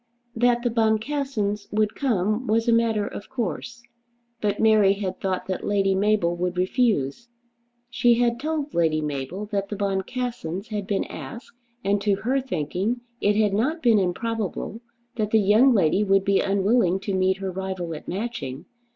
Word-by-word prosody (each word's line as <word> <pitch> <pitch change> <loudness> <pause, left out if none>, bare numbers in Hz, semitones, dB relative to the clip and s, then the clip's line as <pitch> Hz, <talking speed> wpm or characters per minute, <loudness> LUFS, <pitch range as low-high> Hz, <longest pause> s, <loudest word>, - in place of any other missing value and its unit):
That 240 +1 +2
the 240 - +1
Boncassens 220 -1 0
would 215 0 +1
come 220 -2 0
was 225 +2 +1
a 235 - +4
matter 225 -3 +2
of 200 - -8
course; 235 - -4 0.6
but 205 -1 0
Mary 215 -3 +5
had 195 -2 -4
thought 190 -1 -1
that 185 - -4
Lady 195 -1 +2
Mabel 195 -3 +2
would 180 +1 -2
refuse. 195 - 0 0.6
She 240 -1 +4
had 235 0 +1
told 300 0 -3
Lady 160 -2 +2
Mabel 150 +6 -4
that 200 -1 -1
the 210 - -3
Boncassens 200 -1 -3
had 205 -3 -4
been 200 - 0
asked, 235 +1 -9 0.3
and 200 +1 +1
to 205 -1 +2
her 260 +7 0
thinking 210 - -2 0.2
it 205 0 +3
had 210 -2 +2
not 270 +10 0
been 230 -4 +5
improbable 220 +3 -2 0.4
that 215 -2 0
the 220 - +4
young 215 +6 +5
lady 195 -2 +3
would 195 -1 +2
be 200 -1 +3
unwilling 195 -1 +2
to 200 - -3
meet 190 0 +2
her 190 -1 -4
rival 185 -2 -4
at 150 - -9
Matching. 185 - -4
205 Hz, 165 wpm, -24 LUFS, 190-235 Hz, 0.6 s, Mary